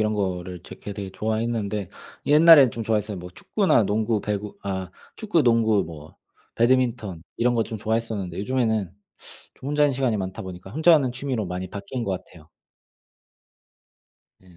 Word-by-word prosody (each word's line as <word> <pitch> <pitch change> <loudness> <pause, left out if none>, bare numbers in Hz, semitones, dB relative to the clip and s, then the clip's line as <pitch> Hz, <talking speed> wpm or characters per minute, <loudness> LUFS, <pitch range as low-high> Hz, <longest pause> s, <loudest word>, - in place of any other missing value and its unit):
이런 110 0 +1
거를 90 -3 -3
제 - - -10
그 100 - -8
되게 100 -2 -6
좋아했는데 110 -1 -2 0.4
옛날엔 150 -3 +8
좀 115 - -4
좋아했어요. 105 -3 -1
뭐 90 0 -8
축구나 190 - +2
농구, 110 +1 0
배구 105 0 -4
아 95 -2 -4 0.3
축구, 205 -8 +1
농구 110 -3 +3
뭐 80 -2 -11 0.4
배드민턴 120 -7 +1
이런 120 +1 +2
거 115 - +2
좀 110 - -6
좋아했었는데 110 -5 -2
요즘에는 110 -5 0 0.6
좀 135 - -8
혼자 150 0 +2
있는 145 - +2
시간이 125 -4 +1
많다 95 +3 -4
보니까 95 0 -9
혼자 160 +6 +5
하는 130 -5 +2
취미로 125 -5 -3
많이 90 +1 -4
바뀐 110 +4 -5
것 95 - -1
같아요. 85 -3 -9 1.9
네. 90 -2 -20
110 Hz, 340 characters per minute, -24 LUFS, 95-120 Hz, 1.9 s, 옛날엔